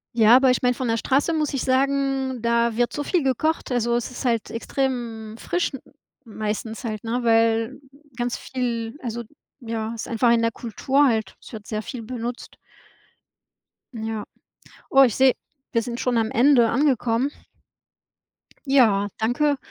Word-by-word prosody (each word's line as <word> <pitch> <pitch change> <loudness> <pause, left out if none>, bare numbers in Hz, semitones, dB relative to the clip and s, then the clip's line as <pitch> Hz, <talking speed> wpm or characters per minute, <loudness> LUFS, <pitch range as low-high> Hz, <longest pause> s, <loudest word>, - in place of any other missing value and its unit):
Ja, 225 +1 +7
aber 260 0 +5
ich 250 - 0
meine 250 0 +3
von 245 -1 -3
der 225 - +1
Straße 280 +7 +1
muss 305 -2 -1
ich 270 - -1
sagen, 270 -1 0
da 235 -1 +1
wird 240 0 +1
so 290 - -4
viel 340 0 0
gekocht. 275 +3 0
Also, 240 -1 +1
es 240 +1 -2
ist 250 - -7
halt 230 -3 0
extrem 230 -3 -3
frisch 350 +7 -1 0.5
meistens 220 +2 -4
halt, 215 -2 -4
ne, 240 +2 -1
weil 225 +2 +2 0.4
ganz 240 0 -2
viel 240 -1 -3
also, 235 -1 -4 0.4
ja, 225 -1 -4
ist 230 - -6
einfach 235 +1 +2
in 230 -1 +3
der 230 0 +1
Kultur 265 +6 +1
halt, 220 -6 0
es - - -14
wird 215 -2 -8
sehr 215 -1 -3
viel 240 +1 -7
benutzt. 240 +1 -6 1.4
Ja. 220 -2 -4 0.7
Oh, 270 0 +7
ich 240 -6 +4
sehe, 260 -1 +4 0.4
wir 230 -1 +2
sind 240 +1 -5
schon 250 -2 0
am 225 -1 +1
Ende 245 -2 +4
angekommen. 255 -1 +1 1.4
Ja, 220 -7 +4
danke 275 +6 +1
240 Hz, 160 wpm, -23 LUFS, 225-265 Hz, 1.4 s, Ja